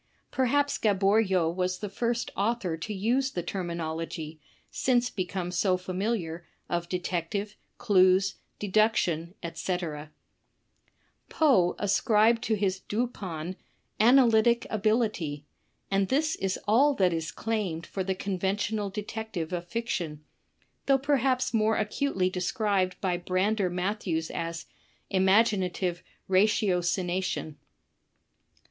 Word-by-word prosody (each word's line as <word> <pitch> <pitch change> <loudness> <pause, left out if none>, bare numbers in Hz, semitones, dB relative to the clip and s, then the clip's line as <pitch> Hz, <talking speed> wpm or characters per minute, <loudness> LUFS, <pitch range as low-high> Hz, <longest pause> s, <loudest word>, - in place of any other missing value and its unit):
Perhaps 285 +3 +1
Gaboriau 195 -3 +3
was 185 0 -1
the 210 - -5
first 235 +4 -2
author 200 -4 0
to 165 +6 -6
use 235 +7 +1
the 175 -9 -4
termi 175 -1 -4
nology, 160 -1 -5 0.3
since 245 -1 +1
become 180 -1 -3
so 185 +1 +2
familiar, 185 -2 -3 0.2
of 175 0 -2
detective, 180 +3 -3 0.2
clues, 190 0 +3 0.2
deduc 215 +2 +3
tion, 170 +1 -1
etc 165 -3 -4 1.2
Poe 210 - +3
ascribed 215 +3 +3
to 220 - +1
his 195 -2 0
Dupin, 190 -7 -4 0.4
"analytic 235 -1 +5
ability," 210 -9 0 0.5
and 195 0 +2
this 305 +6 +1
is 195 0 -1
all 275 +7 +4
that 185 -5 +2
is 160 0 -3
claimed 200 -7 -2
for 190 - -4
the 190 0 -1
conventional 200 +2 -1
detective 205 -4 -5
of 175 0 -3
fiction, 170 -8 -3 0.6
though 275 -1 +5
perhaps 265 -2 +1
more 220 0 +2
acutely 210 -3 0
described 185 0 0
by 180 -3 0
Brander 185 +3 0
Mat 185 +4 -2
thews 160 -3 -2
as 165 0 -4 0.5
"imaginative 190 -2 +2 0.3
ratiocination." 185 -4 +1
195 Hz, 110 wpm, -28 LUFS, 175-220 Hz, 1.2 s, analytic